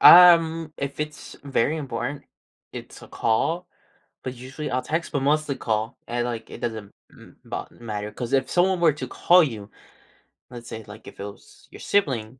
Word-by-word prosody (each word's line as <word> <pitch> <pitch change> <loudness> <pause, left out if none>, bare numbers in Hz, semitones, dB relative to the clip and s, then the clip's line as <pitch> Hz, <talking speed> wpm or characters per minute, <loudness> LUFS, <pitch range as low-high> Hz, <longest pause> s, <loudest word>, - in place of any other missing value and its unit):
Um, 165 -3 +8
if 140 +1 -4
it's 150 0 -6
very 140 +2 +1
important, 140 0 -4 0.5
it's - - -9
a - - -12
call, 160 +11 0 0.6
but 130 - -4
usually, 130 +5 -6
I'll 130 - +1
text, 160 +5 -2
but 140 - 0
mostly 145 0 +1
call, 110 -2 -2
and, 120 0 -1
like, 115 -2 -4
it - - -9
doesn't 110 -3 -4 0.2
m - - -17
bo - - -5
matter, 105 -2 -5
'cause 120 +1 -5
if 135 -1 +2
someone 185 +1 +3
were 165 -3 +5
to 135 -3 -5
call 175 +7 +5
you, 110 -8 -4 0.8
let's 120 -1 -9
say, 110 - -6
like, 105 +1 -12
if - - -12
it - - -4
was 100 - -13
your - - -11
sibling, 130 - 0
130 Hz, 180 wpm, -25 LUFS, 115-155 Hz, 0.8 s, Um